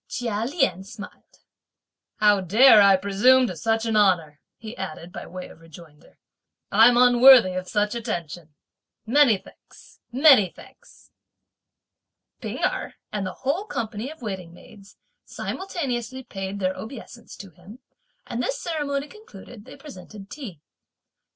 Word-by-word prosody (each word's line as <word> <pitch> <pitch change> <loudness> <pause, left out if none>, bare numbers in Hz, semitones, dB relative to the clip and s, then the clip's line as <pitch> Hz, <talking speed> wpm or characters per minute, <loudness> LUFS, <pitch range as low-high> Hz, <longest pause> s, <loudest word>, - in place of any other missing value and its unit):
Chia 230 -3 -3
Lien 270 - -1
smiled. 205 +1 -13 0.7
"How 210 -2 +3
dare 215 +5 +6
I 200 -1 +6
presume 205 +7 +3
to 185 - -5
such 225 +7 -1
an 225 -1 -1
honour," 170 -8 +1 0.2
he 225 0 -10
added 175 -2 -8
by - - -8
way 180 +1 -9
of - - -17
rejoinder; 165 -2 -17 0.5
"I'm 230 +4 +5
unworthy 245 -4 +6
of 185 0 -5
such 210 +1 -1
attention! 175 - -6 0.5
Many 245 -2 +4
thanks, - - -20
many 260 - +5
thanks." - - -19 1.3
P'ing - - -6
Erh - - -2 0.2
and 200 -3 -3
the - - -6
whole 325 +10 -1
company 225 - -5
of 315 -5 -14
waiting 190 -5 -6
maids 200 +1 -17 0.3
simultaneously 260 - -5
paid 195 -3 -7
their 185 -1 -1
obeisance 235 0 -11
to 195 -2 -12
him, 180 +8 -15 0.5
and - - -4
this - - -3
ceremony 290 -6 -3
concluded, 240 - -14
they 260 - -13
presented 205 - -13
tea. 210 - -9
215 Hz, 135 wpm, -23 LUFS, 190-255 Hz, 1.3 s, dare